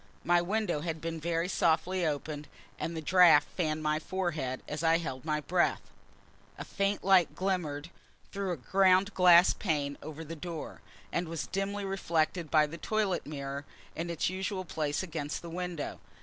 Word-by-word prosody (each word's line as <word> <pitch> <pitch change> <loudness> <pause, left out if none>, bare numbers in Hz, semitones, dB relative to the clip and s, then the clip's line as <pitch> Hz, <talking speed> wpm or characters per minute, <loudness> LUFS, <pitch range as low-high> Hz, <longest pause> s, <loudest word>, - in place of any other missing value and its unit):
My 175 +1 +4
window 190 -3 0
had 160 -1 -3
been 165 0 -4
very 165 +1 -1
softly 175 +1 +1
opened, 150 0 -4 0.3
and 165 0 -3
the 160 - -5
draught 170 -3 +6
fanned 155 -3 -1
my 155 0 +1
forehead 155 -8 -3
as 150 +1 -4
I 165 0 +5
held 145 -5 -5
my 150 -1 0
breath. 175 +3 +1 0.7
A - - -6
faint 200 0 -1
light 190 -3 +4
glimmered 170 -5 -2 0.4
through 195 -2 -2
a 175 - -2
ground 190 - +3
glass 180 -1 +7
pane 145 -6 -2
over 155 +2 -7
the 165 +1 -7
door; 165 0 -7 0.3
and 170 0 -1
was 165 -1 -4
dimly 200 +1 -2
reflected 170 -3 0
by 155 0 +5
the 165 +3 -8
toilet 215 -7 -1
mirror, 140 -1 -5 0.3
in 170 +2 -3
its 170 -2 -1
usual 185 +1 -3
place 155 0 -2
against 155 -4 -4
the 170 - -7
window. 175 -3 -4
165 Hz, 165 wpm, -30 LUFS, 155-185 Hz, 0.7 s, glass